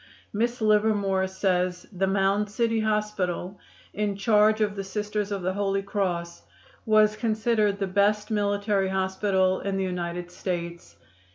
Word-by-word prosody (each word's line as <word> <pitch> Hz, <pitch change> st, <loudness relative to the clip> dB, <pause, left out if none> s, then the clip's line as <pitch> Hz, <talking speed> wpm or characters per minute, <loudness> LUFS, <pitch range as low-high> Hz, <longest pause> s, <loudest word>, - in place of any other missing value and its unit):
Miss 235 Hz, +3 st, -1 dB
Livermore 210 Hz, -3 st, +2 dB
says 185 Hz, -1 st, -1 dB
the 195 Hz, 0 st, 0 dB
Mound 195 Hz, +2 st, +1 dB
City 225 Hz, +1 st, 0 dB
Hospital, 210 Hz, -4 st, -1 dB, 0.3 s
in 205 Hz, -1 st, -1 dB
charge 210 Hz, +1 st, +3 dB
of 210 Hz, -1 st, 0 dB
the 195 Hz, -, -4 dB
Sisters 210 Hz, +1 st, -3 dB
of 195 Hz, -2 st, -3 dB
the 185 Hz, +1 st, 0 dB
Holy 195 Hz, 0 st, -1 dB
Cross, 180 Hz, -4 st, -2 dB, 0.5 s
was 215 Hz, -1 st, +4 dB
considered 215 Hz, -2 st, +1 dB
the 200 Hz, -, -1 dB
best 205 Hz, +3 st, +1 dB
military 205 Hz, -1 st, +1 dB
hospital 190 Hz, 0 st, +1 dB
in 195 Hz, -1 st, -2 dB
the 195 Hz, -, 0 dB
United 175 Hz, -1 st, -4 dB
States. 170 Hz, -2 st, -5 dB
200 Hz, 140 wpm, -26 LUFS, 190-210 Hz, 0.5 s, was